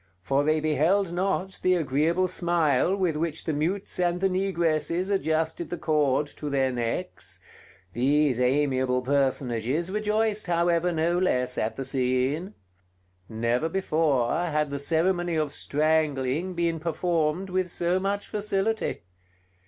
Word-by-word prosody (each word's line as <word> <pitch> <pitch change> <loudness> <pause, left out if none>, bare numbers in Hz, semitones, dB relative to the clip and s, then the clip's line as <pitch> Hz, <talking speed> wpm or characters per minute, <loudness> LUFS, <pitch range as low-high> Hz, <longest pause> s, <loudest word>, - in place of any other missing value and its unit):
for 135 +8 +1
they 155 +1 +2
beheld 160 +5 +1
not 190 +1 -1
the 185 0 +3
agreeable 165 +4 +1
smile 170 -2 +1
with 180 -5 0
which 160 0 -1
the 160 - -2
mutes 180 +7 -2
and 175 0 +1
the 195 - +2
negresses 175 -1 0
adjusted 160 -3 -1
the 175 - -4
cord 150 -3 +1
to 150 0 -7
their 135 -2 +1
necks: 120 +9 -4 0.5
these 135 +1 +2
amiable 130 -1 +1
personages 135 +3 0
rejoiced, 215 0 0
however, 170 0 +2
no 170 +2 +1
less 125 -8 +1
at 110 - -2
the 135 - -4
scene. 135 +7 0 0.7
Never 115 +7 0
before 155 -9 +1
had 150 -4 0
the 140 - -3
ceremony 175 +3 +1
of 155 -2 0
strangling 155 +2 0
been 170 -1 0
performed 170 +2 -1
with 185 -1 0
so 175 +2 0
much 200 +1 -2
facility. 210 - -1
160 Hz, 130 wpm, -26 LUFS, 140-180 Hz, 0.7 s, the